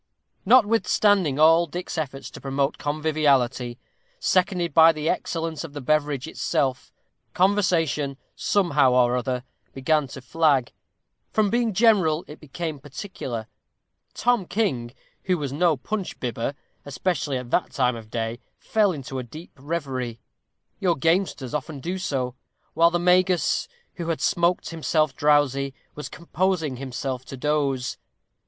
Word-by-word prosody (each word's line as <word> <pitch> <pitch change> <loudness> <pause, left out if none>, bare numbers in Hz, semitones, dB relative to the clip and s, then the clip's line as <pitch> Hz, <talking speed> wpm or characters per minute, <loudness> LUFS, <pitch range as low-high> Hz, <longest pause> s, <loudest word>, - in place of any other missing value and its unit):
Notwithstanding 205 - +4
all 165 +2 +5
Dick's 175 +4 -5
efforts 140 -4 -4
to - - -11
promote 135 +1 -1
conviviality, 145 -5 +1 0.4
seconded 180 - +1
by 165 +1 +8
the 155 -1 -4
excellence 165 -1 -2
of 160 -3 -9
the 145 - -5
beverage 145 -1 0
itself, 130 -2 -1 0.4
conversation, 165 -8 +2 0.2
somehow 150 -10 +2
or 125 -1 +4
other, 125 0 -2 0.3
began 150 +2 +1
to 135 +1 -9
flag; 140 -1 +2 0.6
from 210 -2 +1
being 235 -1 +1
general 185 -7 +3
it 150 - -11
became 155 +1 -5
particular. 135 - -6 0.7
Tom 240 -6 +1
King, 135 - -1 0.3
who 185 -1 +2
was 140 -4 -4
no 160 0 +2
punch 195 - -4
bibber, 120 +2 -3 0.3
especially 145 0 -2
at 125 -1 -7
that 180 - +1
time 125 -3 +1
of 110 -2 -10
day, 115 +1 -3 0.2
fell 210 -3 +2
into 135 -4 -5
a - - -4
deep 155 +8 -11
reverie; 135 -5 -4 0.6
your 180 -3 +2
gamesters 165 -4 0
often 150 0 -4
do 180 +7 -3
so; 130 -8 -2 0.4
while 170 0 +5
the 175 - 0
Magus, 180 +1 +2 0.3
who 170 -3 -4
had 165 -2 -1
smoked 175 -2 +1
himself 155 -3 0
drowsy, 140 -2 +2 0.2
was 150 - -7
composing 170 -5 -1
himself 130 0 -4
to - - -8
a - - -12
doze. 140 -3 0
150 Hz, 135 wpm, -24 LUFS, 135-175 Hz, 0.7 s, by